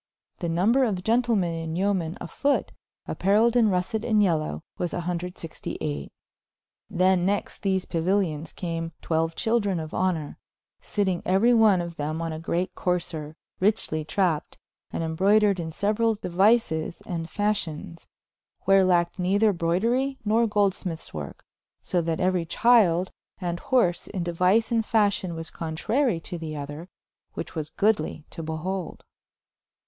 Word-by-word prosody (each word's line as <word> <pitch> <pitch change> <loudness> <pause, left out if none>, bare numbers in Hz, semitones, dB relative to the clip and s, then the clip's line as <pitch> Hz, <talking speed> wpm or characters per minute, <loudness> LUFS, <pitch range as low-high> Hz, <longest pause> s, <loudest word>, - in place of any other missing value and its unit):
The 170 - -2
nomber 210 +11 +3
of 195 -7 -1
Gentlemen 225 -6 +2
and 165 0 -4
yomen 185 -4 0
a 175 - -6
fote, 285 +10 0 0.4
appareiled 215 +5 +2
in 230 -3 +5
russet 195 +4 -1
and 220 -3 +2
yealow 165 -6 +1 0.2
was 175 -1 -2
clxviii. 170 - -4 0.8
Then 185 0 +3
next 200 +2 -1
these 190 -2 0
Pauilions 170 -2 0
came 165 -2 -4
xii - - -15
chyldren 185 +5 +1
of 155 -1 -6
honor, 175 -5 -1 0.4
sitting 190 -4 -1
euery 200 +6 +4
one 215 -5 +5
of 170 -1 -6
them 155 +2 -2
on 165 -1 -3
a 155 - -5
greate 180 +3 -2
courser, 160 -4 -2 0.3
rychely 185 -6 +1
trapped, 160 0 -1 0.3
and - - -2
embroudered 195 +4 +3
in 165 -1 -3
seuerall 215 +5 +1
deuises 180 -4 +1
and 165 -2 -4
facions, 170 -6 -2 0.5
where 195 0 +5
lacked 175 0 +2
neither 200 +4 +3
brouderie 230 +11 0
nor 225 +2 +3
goldsmythes 195 -5 -1
work, 75 -3 -7 0.4
so 175 - 0
that 165 -1 -1
euery 180 -2 +1
chyld 190 -5 +4 0.3
and 175 -2 -3
horse 185 -9 +1
in 185 -4 -3
deuice 180 +7 +2
and 230 -1 +2
fascion 205 -5 +1
was 165 0 -6
contrary 175 - 0
to 175 +1 -7
the 155 -2 -5
other, 145 +4 -7 0.5
which - - -5
was 155 -2 -4
goodly 195 -7 0
to 165 - -6
beholde. 165 +3 -4
180 Hz, 140 wpm, -26 LUFS, 165-205 Hz, 0.8 s, in